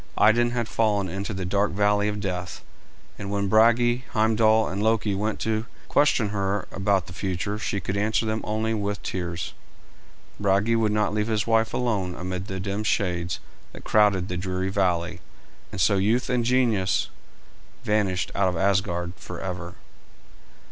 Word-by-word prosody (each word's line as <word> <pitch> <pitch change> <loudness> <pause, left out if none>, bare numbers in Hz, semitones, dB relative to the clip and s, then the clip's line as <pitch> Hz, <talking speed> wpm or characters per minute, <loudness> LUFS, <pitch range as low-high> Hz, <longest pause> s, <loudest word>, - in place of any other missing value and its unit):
Idun 120 +3 +5
had 120 -2 -2
fallen 105 -4 +1
into 100 +4 -4
the 95 -2 -4
dark 100 +2 +1
valley 105 +1 +2
of 105 0 -2
death, 90 -3 -4 0.6
and 100 - -5
when 100 0 -1
Brage, 120 +4 +4
Heimdal, 110 0 +3
and 95 +3 -3
Loki 110 -1 +1
went 105 +2 -2
to 110 +1 -1 0.2
question 140 -7 +3
her 100 -1 -1
about 95 -2 +1
the 85 - -10
future 95 +3 -3
she 100 - -2
could 95 +1 -4
answer 110 +2 +1
them 110 0 -1
only 110 +1 -1
with 105 -1 -3
tears. 85 -2 -4 0.9
Brage 100 +3 +2
would 110 -2 +2
not 105 -1 +1
leave 105 0 0
his 110 -2 +1
beautiful 115 - -3
wife 115 0 +2
alone 100 -8 -1
amid 90 +1 -5
the 95 0 -4
dim 100 +2 -3
shades 90 -5 -1 0.3
that - - -11
crowded 100 -4 +3
the 90 - -3
dreary 95 +1 -2
valley, 90 -3 0 0.5
and - - -6
so 100 +3 +3
youth 110 +7 +1
and 120 -2 +1
genius 115 -7 +2 0.7
vanished 100 -3 0
out 95 -2 +2
of 90 - -3
Asgard 90 -2 0
forever. 90 -1 -6
100 Hz, 160 wpm, -25 LUFS, 95-110 Hz, 0.9 s, Idun